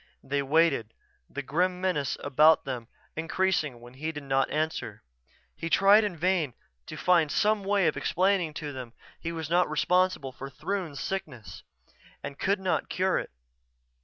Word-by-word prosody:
They 140 Hz, +1 st, -1 dB
waited, 140 Hz, -6 st, +2 dB, 0.3 s
the 140 Hz, -, -5 dB
grim 180 Hz, +6 st, 0 dB
menace 180 Hz, -7 st, -1 dB
about 155 Hz, +4 st, +5 dB
them 125 Hz, -4 st, -5 dB, 0.3 s
increasing 160 Hz, -5 st, 0 dB
when 120 Hz, +1 st, -13 dB
he 155 Hz, +5 st, -4 dB
did 150 Hz, -2 st, -7 dB
not 135 Hz, -1 st, +1 dB
answer. 150 Hz, -9 st, -3 dB, 0.5 s
He 165 Hz, -, -4 dB
tried 200 Hz, +5 st, +6 dB
in 200 Hz, -5 st, -2 dB
vain 170 Hz, -6 st, +1 dB, 0.3 s
to -, -, -7 dB
find 170 Hz, -5 st, +3 dB
some 210 Hz, -1 st, +2 dB
way 200 Hz, -1 st, +2 dB
of 155 Hz, -, +2 dB
explaining 180 Hz, -4 st, +1 dB
to 150 Hz, -2 st, -5 dB
them 125 Hz, -3 st, -8 dB, 0.3 s
he 165 Hz, -, -4 dB
was 160 Hz, -2 st, -4 dB
not 175 Hz, +2 st, +2 dB
responsible 180 Hz, -2 st, +1 dB
for 135 Hz, +1 st, -8 dB
Throon's 175 Hz, -2 st, -4 dB
sickness 150 Hz, -, -5 dB, 0.6 s
and 140 Hz, -, -7 dB
could 200 Hz, +1 st, +1 dB
not 190 Hz, -1 st, -1 dB
cure 185 Hz, +1 st, +1 dB
it. -, -, -6 dB
160 Hz, 160 wpm, -28 LUFS, 140-185 Hz, 0.6 s, tried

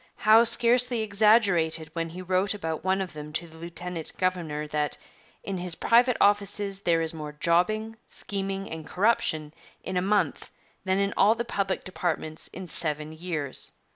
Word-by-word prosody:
Howe 220 Hz, +2 st, +5 dB
scarcely 240 Hz, +1 st, +4 dB
exaggerated 200 Hz, -7 st, +3 dB
when 165 Hz, -1 st, -3 dB
he 180 Hz, +3 st, -8 dB
wrote 185 Hz, +3 st, 0 dB
about 160 Hz, -5 st, -4 dB
one 190 Hz, +1 st, +1 dB
of 185 Hz, -, -5 dB
them 150 Hz, 0 st, -8 dB
to 170 Hz, +2 st, -2 dB
the 160 Hz, 0 st, -15 dB
lieutenant 170 Hz, 0 st, -5 dB
governor 170 Hz, -5 st, -1 dB
that 150 Hz, -1 st, -1 dB, 0.5 s
'in 195 Hz, -2 st, -4 dB
his 175 Hz, -2 st, -2 dB
private 240 Hz, +5 st, +3 dB
offices 200 Hz, -1 st, +1 dB
there 170 Hz, -4 st, +1 dB
is 160 Hz, 0 st, -2 dB
more 150 Hz, -2 st, -7 dB
jobbing, 215 Hz, +8 st, 0 dB
scheming, 195 Hz, -1 st, -4 dB
and 160 Hz, -1 st, -7 dB
corruption 160 Hz, -7 st, +1 dB, 0.3 s
in 185 Hz, -, -3 dB
a -, -, +2 dB
month 205 Hz, +2 st, 0 dB, 0.4 s
than 190 Hz, 0 st, +1 dB
in 200 Hz, 0 st, 0 dB
all 210 Hz, +3 st, +5 dB
the 235 Hz, +1 st, -3 dB
public 200 Hz, -4 st, -2 dB
departments 160 Hz, -4 st, -3 dB
in 190 Hz, -1 st, -9 dB
seven 150 Hz, -2 st, 0 dB
years.' 155 Hz, -4 st, -3 dB
185 Hz, 165 wpm, -27 LUFS, 160-205 Hz, 0.5 s, Howe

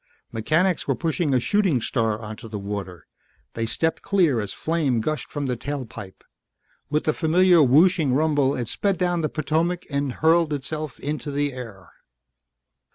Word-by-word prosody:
Mechanics 155 Hz, -, +1 dB
were 135 Hz, -, +1 dB
pushing 165 Hz, 0 st, -1 dB
a 130 Hz, -, +3 dB
Shooting 190 Hz, -, +2 dB
Star 110 Hz, -1 st, -1 dB
onto 110 Hz, 0 st, -8 dB
the 105 Hz, -, -5 dB
water. 100 Hz, -4 st, -6 dB, 0.5 s
They 115 Hz, 0 st, -2 dB
stepped 160 Hz, +7 st, -1 dB
clear 170 Hz, -, +2 dB
as 105 Hz, -2 st, -3 dB
flame 155 Hz, -7 st, 0 dB
gushed 155 Hz, +7 st, -3 dB
from 145 Hz, -1 st, -3 dB
the 125 Hz, -2 st, -1 dB
tail 140 Hz, +2 st, -4 dB
pipe; 105 Hz, -4 st, -11 dB, 0.7 s
with 150 Hz, +1 st, 0 dB
the 155 Hz, -, +1 dB
familiar 175 Hz, +2 st, +4 dB
whooshing 150 Hz, +2 st, +4 dB
rumble 145 Hz, -1 st, +2 dB
it 120 Hz, -2 st, -3 dB
sped 195 Hz, -, 0 dB
down 175 Hz, -1 st, 0 dB
the 155 Hz, -, -1 dB
Potomac 165 Hz, +4 st, -1 dB
and 140 Hz, -2 st, -1 dB
hurled 160 Hz, +1 st, +3 dB
itself 150 Hz, +1 st, -5 dB
into 150 Hz, 0 st, -4 dB
the 145 Hz, 0 st, -1 dB
air. 110 Hz, -8 st, -10 dB
145 Hz, 160 wpm, -24 LUFS, 120-160 Hz, 0.7 s, familiar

